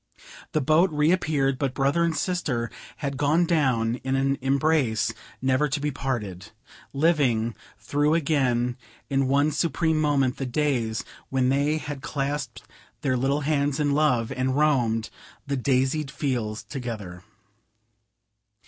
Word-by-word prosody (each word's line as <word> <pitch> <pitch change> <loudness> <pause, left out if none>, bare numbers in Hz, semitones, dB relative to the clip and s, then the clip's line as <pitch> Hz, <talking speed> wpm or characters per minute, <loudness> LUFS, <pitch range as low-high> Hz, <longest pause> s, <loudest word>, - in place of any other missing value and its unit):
The 155 - +2
boat 155 +7 +4
reappeared, 150 -4 +1
but 135 -2 -1
brother 140 +5 +2
and 165 -2 0
sister 140 -11 -1 0.3
had 140 -2 -3
gone 150 +5 +3
down 125 -8 +1
in 130 +1 -2
an 135 +1 +1
embrace 135 -4 +1 0.3
never 130 +3 +2
to 145 +1 -2
be 150 +1 -1
parted; 110 -8 -4 0.4
living 135 -7 +2 0.2
through 145 +8 +1
again 130 -6 +1 0.3
in 135 -1 +2
one 140 +3 +3
supreme 160 +1 +1
moment 140 -4 +2
the 135 - -3
days 125 -4 0 0.2
when 130 -1 +1
they 140 +3 +2
had 145 -3 -6
clasped 140 -3 -3 0.4
their 130 -2 +1
little 135 +4 +1
hands 145 -1 0
in 145 -1 +2
love, 140 -6 +2
and 130 0 -1
roamed 120 -7 +2 0.3
the 140 -1 -1
daisied 135 +3 +1
fields 120 -7 -2
together. 110 -9 -6
135 Hz, 130 wpm, -25 LUFS, 125-150 Hz, 0.4 s, boat